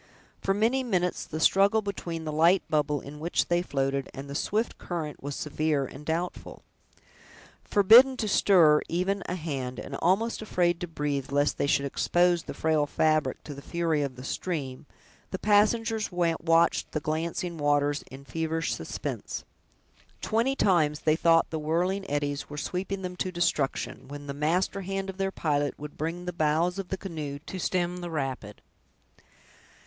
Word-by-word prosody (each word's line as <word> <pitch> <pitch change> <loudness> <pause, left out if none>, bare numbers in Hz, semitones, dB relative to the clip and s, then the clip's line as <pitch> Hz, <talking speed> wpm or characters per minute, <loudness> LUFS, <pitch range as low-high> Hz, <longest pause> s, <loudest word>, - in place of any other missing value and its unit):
For 195 - +1
many 230 +6 +2
minutes 180 -8 -1
the 155 - -5
struggle 200 +6 +4
between 170 -5 -4
the 155 - -2
light 165 +5 +4
bubble 150 -2 +1
in 150 +1 -10
which 165 +3 0
they 175 0 +3
floated 135 -4 -1
and 135 +1 -7
the 140 - -7
swift 210 +9 -1
current 160 -4 -5
was 145 0 -4
severe 150 -1 0
and 135 +3 -10
doubtful. 165 +3 -4 1.0
Forbidden 235 +6 +7
to 220 - -1
stir 170 -7 +5
even 190 +3 0
a 180 - -2
hand, 135 -7 -4
and - - -6
almost 215 +7 +1
afraid 175 -5 +1
to 175 - -3
breath, 145 -4 -3
lest 145 +1 +1
they - - +1
should 140 0 +2
expose 175 +5 +2
the - - -8
frail 155 -2 +1
fabric 155 -3 +1
to 150 - -7
the 140 - -9
fury 165 -1 0
of 140 -3 -3
the 130 - -9
stream, 140 -3 -4 0.4
the 190 - -3
passengers 215 +2 +2
watched 165 -1 +2
the 155 - 0
glancing 165 +2 -3
waters 145 0 +1
in 135 +1 -11
feverish 160 +1 -2
suspense. - - -5 0.7
Twenty 230 +5 +1
times 155 - +2
they 155 -1 +3
thought 165 0 +3
the 160 - -2
whirling 180 +6 -1
eddies 145 0 -2
were 150 - -7
sweeping 190 +5 -3
them 180 0 -4
to 185 - -2
destruction, 170 -6 -1
when 145 +1 -8
the 140 - -4
master 170 +7 0
hand 195 +1 -3
of 190 - -18
their 195 0 0
pilot 145 -5 -1
would 150 0 -8
bring 165 +3 -4
the 180 - -3
bows 165 +4 +1
of 195 - -4
the 190 - -3
canoe 155 -7 -5
to 190 - -6
stem 180 0 0
the 175 -1 -5
rapid. 135 -9 -4
165 Hz, 170 wpm, -28 LUFS, 145-185 Hz, 1.0 s, Forbidden